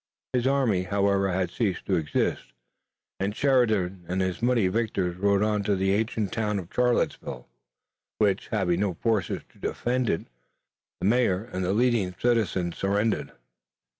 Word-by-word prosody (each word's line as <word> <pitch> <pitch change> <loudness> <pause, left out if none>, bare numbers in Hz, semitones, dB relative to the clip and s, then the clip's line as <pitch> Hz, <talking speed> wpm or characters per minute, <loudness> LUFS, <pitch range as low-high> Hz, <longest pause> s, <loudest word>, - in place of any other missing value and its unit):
His 125 0 +1
army, 130 -9 +2
however, 100 +1 +1
had 90 0 -1
ceased 100 -6 -1
to 95 - +1
exist, 75 -6 -1 0.7
and 100 +2 -1
Sheridan 110 -10 +2
and 90 +2 -1
his 95 +1 -1
muddy 120 -5 +3
victors 95 -4 -1
rode 100 +2 +2
on 105 -1 +1
to 100 - +2
the 95 +1 +1
ancient 110 -1 -1
town 105 -2 0
of 90 -2 -7
Charlottesville, 120 - 0 0.7
which, 100 -2 +1
having 90 -5 0
no 100 -3 0
forces 110 -1 -1
to - - -24
defend 125 0 -1
it, 80 - 0 0.8
the - - -1
mayor 105 -3 +2
and 95 - -2
the 90 - 0
leading 110 -4 +1
citizens 105 -7 0
surrendered. 100 +3 0
100 Hz, 150 wpm, -26 LUFS, 95-115 Hz, 0.8 s, muddy